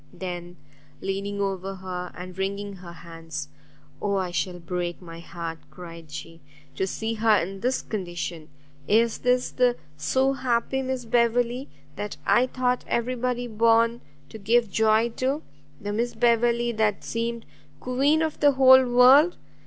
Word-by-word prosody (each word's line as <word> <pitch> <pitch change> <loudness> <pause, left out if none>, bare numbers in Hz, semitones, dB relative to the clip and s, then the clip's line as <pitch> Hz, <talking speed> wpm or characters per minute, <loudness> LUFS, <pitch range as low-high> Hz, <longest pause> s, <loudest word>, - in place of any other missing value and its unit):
Then, 175 -1 -6 0.4
leaning 200 +1 -3
over 195 0 -2
her, 180 -1 -6
and 180 0 -8
wringing 200 +1 -3
her 180 -1 -10
hands, 165 -3 -8 0.5
"Oh 200 -1 0
I 185 -2 -1
shall 180 0 -2
break 175 0 -4
my 165 -2 -10
heart," 170 -1 -6
she 145 0 -29
cried, 165 0 -11 0.7
"to 190 - 0
see 220 +3 -3
her 220 -1 +3
in 195 +3 -3
this 250 +5 -1
condition! 175 -5 -5 0.4
Is 225 +2 +3
this 250 0 +1
the 245 -1 +2 0.2
so 265 - +1
happy 260 0 0
Miss 260 -2 -3
Beverley, 240 +2 +1 0.3
that 205 0 -5
I 240 +6 +4
thought 250 -1 -1
every 235 +2 0
body 250 0 -2
born 230 +1 +2 0.3
to 220 - -10
give 225 +1 +2
joy 220 +2 +3
to? 270 +4 -1 0.4
the 205 0 -4
Miss 235 +3 -1
Beverley 235 0 +2
that 215 -3 0
seemed 230 0 -3 0.3
queen 280 +5 +2
of 315 -1 -3
the 290 -1 +5
whole 260 0 +7
world! 260 +7 +6
220 Hz, 150 wpm, -25 LUFS, 185-245 Hz, 0.7 s, whole